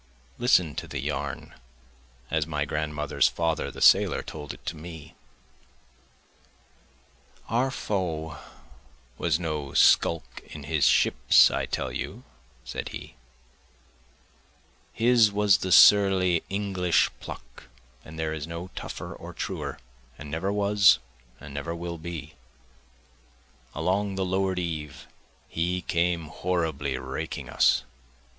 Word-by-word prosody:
List 120 -3 +5 0.2
to - - -4
the 75 - -6
yarn, 70 -1 -4 0.8
as 80 -2 0
my 75 -2 -1
grandmother's 75 0 0
father 80 -2 -1
the - - -10
sailor - - +5
told 75 -2 -7
it - - -14
to - - -3
me. 80 -1 -10 2.3
Our 125 +3 +1
foe 80 - -3 0.8
was 80 - +1
no 75 -5 -4
skulk 85 -1 +3
in 75 - -9
his 75 0 +2
ship - - +4 0.4
I - - -2
tell 65 - -3
you, - - -6 0.4
(said 65 - -5
he,) - - -9 1.8
His 115 -2 +4
was 100 -1 +3
the 95 - -3
surly 95 -4 +6
English 95 -3 +1
pluck, - - -10 0.4
and 80 +1 -11
there 80 -1 -2
is 80 -1 -5
no 85 +2 -7
tougher - - -6
or - - -10
truer, - - -4 0.4
and 75 -1 -9
never 85 +6 -1
was, 100 -2 +5 0.4
and 70 -1 -11
never 70 +4 -4
will 85 0 -6
be; 80 -2 -7 1.4
Along 95 +5 0
the 95 0 -1
lower'd 95 0 0
eve 80 -5 -4 0.4
he 90 +2 -2
came 85 -1 0
horribly 80 -6 -2
raking 65 +1 -5
us. - - +3
85 Hz, 120 wpm, -26 LUFS, 75-95 Hz, 2.3 s, surly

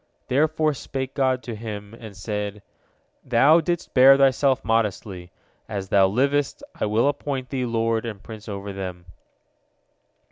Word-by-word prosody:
Therefore 155 +3 +2
spake 135 -1 -5
God 130 -2 +1
to 120 - -6
him, 105 -1 -7
and 110 -4 -11
said, 105 0 -4 0.6
"Thou 140 +7 +5
didst 175 +1 -3
bear 135 +1 +8
thyself 135 0 +3
modestly. 100 -5 -1 0.4
As 95 -2 -4
thou 95 -1 +5
livest, 140 +7 0
I - - -2
will 110 +5 +2
appoint 140 -2 -3
thee 130 -2 -2
lord 115 -1 0
and 110 -4 -7
prince 110 -1 -10
over 100 0 -6
them." 90 -2 -6
115 Hz, 140 wpm, -23 LUFS, 105-135 Hz, 0.6 s, bear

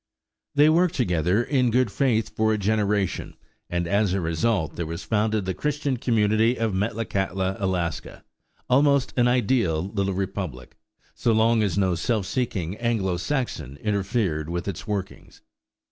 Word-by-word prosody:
They 145 +1 +6
worked 170 +2 +3
together 90 - +1
in 125 -2 +1
good 125 -1 +2
faith 110 -5 0
for 110 0 +2
a 110 - +1
generation; 105 -2 0 0.3
and 85 0 -1
as 100 0 +2
a - - 0
result 85 0 0
there 85 - -3
was 85 +3 -5
founded 110 -2 0
the 95 - -1
Christian 145 -1 -1
community 110 0 +2
of 115 -3 -1
Metlakatla, 95 -2 -1
Alaska, 90 -4 -3 0.4
almost 140 +1 +3
an 120 -1 +3
ideal 110 -9 +1
little 100 -2 -1
republic, 95 -10 -4 0.4
so 115 - +1
long 110 +1 +3
as 100 -4 0
no 95 -2 +2
self 100 +4 -1
seeking 95 -6 -2
Anglo 110 -6 0
Saxon 115 - -3
interfered 95 - -1
with 85 +2 -3
its 100 +2 -5
workings. 100 -3 -5
105 Hz, 145 wpm, -24 LUFS, 95-115 Hz, 0.4 s, They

